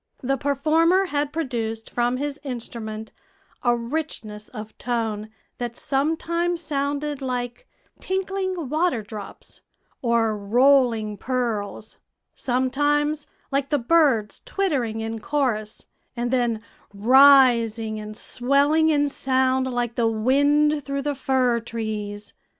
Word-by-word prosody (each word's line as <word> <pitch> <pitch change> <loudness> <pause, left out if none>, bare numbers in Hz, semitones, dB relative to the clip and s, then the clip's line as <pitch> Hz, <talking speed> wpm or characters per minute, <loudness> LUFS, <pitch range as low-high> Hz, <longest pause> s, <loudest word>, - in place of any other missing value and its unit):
The 270 +2 +1
performer 315 +7 +2
had 290 -4 -1
produced 230 -8 -3
from 245 +1 0
his 290 +1 -3
instrument 225 -4 -6 0.5
a 240 -1 +3
richness 235 -5 -5
of 215 -2 -9
tone 225 -3 -2 0.3
that 240 -1 -4
sometimes 335 +5 0
sounded 290 -1 -2
like 250 - -4 0.3
tinkling 375 -3 -2
waterdrops 225 - -3 0.4
or 230 -3 +2
rolling 230 0 +3
pearls; 220 -5 -3 0.4
sometimes 290 +4 0 0.2
like 275 0 0
the 295 - +2
birds 260 -5 +2
twittering 260 - -1
in 225 0 -4
chorus, 220 -6 -2 0.3
and 240 0 -1
then 240 -4 0 0.3
rising 235 -2 +5
and 215 0 -8
swelling 285 +5 +2
in 290 -2 +3
sound 260 -1 +1
like 240 -1 -1
the 235 -1 +1
wind 285 +6 +2
through 275 0 -3
the 290 0 -1
fir 260 -3 +1
trees. 215 -3 -5
255 Hz, 110 wpm, -24 LUFS, 225-290 Hz, 0.5 s, rising